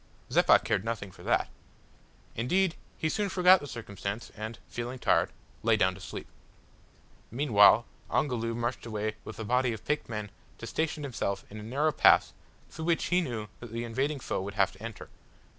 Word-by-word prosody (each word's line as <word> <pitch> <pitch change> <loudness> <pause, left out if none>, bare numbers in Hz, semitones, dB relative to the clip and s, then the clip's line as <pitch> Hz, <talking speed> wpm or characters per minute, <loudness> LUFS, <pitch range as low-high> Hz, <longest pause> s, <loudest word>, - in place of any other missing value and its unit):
Zeppa - - +6
cared 95 - -1
nothing 110 -4 -4
for - - -16
that. - - +1 0.9
Indeed 175 - +2 0.2
he 160 - 0
soon 205 +5 0
forgot 185 0 +6
the 145 - -8
circumstance, 110 -3 -5
and, 110 +1 -6
feeling 120 +6 -5
tired, - - +2 0.3
lay 115 -1 +3
down 95 -3 +3
to - - -12
sleep. - - -7 1.0
Meanwhile 115 -3 +5 0.2
Ongoloo 115 -5 0
marched 120 0 -3
away 110 -1 -3
with - - -8
a 110 - -4
body 125 +1 +2
of 110 - -9
picked 150 -4 -1
men 105 -3 -4 0.3
to - - -7
station 155 +3 -2
himself 105 -7 -3
in 105 - -7
a - - -7
narrow 140 +8 +1
pass - - +5 0.4
through 160 - -6
which 170 -1 +2
he 180 - +5
knew 120 -9 -4
that 120 -2 -9
the 115 +1 -3
invading 135 +5 -1
foe 120 - -2
would 100 +1 -6
have 100 -2 +3
to 95 - -17
enter. 115 -2 -7
115 Hz, 180 wpm, -29 LUFS, 110-145 Hz, 1.0 s, Zeppa